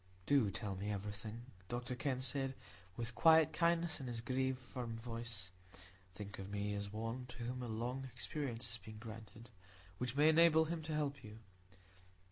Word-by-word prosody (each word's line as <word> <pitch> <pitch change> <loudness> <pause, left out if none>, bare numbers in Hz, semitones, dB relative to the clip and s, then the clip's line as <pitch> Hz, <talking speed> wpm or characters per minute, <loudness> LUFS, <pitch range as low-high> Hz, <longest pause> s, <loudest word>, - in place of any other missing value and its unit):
"Do 135 -5 +5
tell 100 0 -2
me 100 +2 -3
everything," 105 +3 -4 0.3
Dr 120 +1 -2
Kenn 130 +1 0
said, 135 +1 -1 0.4
with 120 0 -2
quiet 160 +3 +7
kindness 170 -1 +2
in 135 - -5
his 120 -2 -2
grave, 130 +1 0
firm 120 -2 -5
voice. 115 -5 -5 0.6
"Think 100 0 -6
of 95 0 -5
me 105 0 -1
as 100 0 -3
one 115 +4 -3
to 125 -1 -7
whom 125 +2 -3
a 125 - -3
long 120 +4 -2
experience 125 -1 -2
has 115 0 -4
been 110 +1 -8
granted, 115 +1 -9 0.5
which 125 0 -1
may 150 +2 +7
enable 160 0 +7
him 165 0 -2
to 155 0 -3
help 145 -3 -1
you." 105 -1 -9
120 Hz, 170 wpm, -38 LUFS, 110-135 Hz, 0.6 s, quiet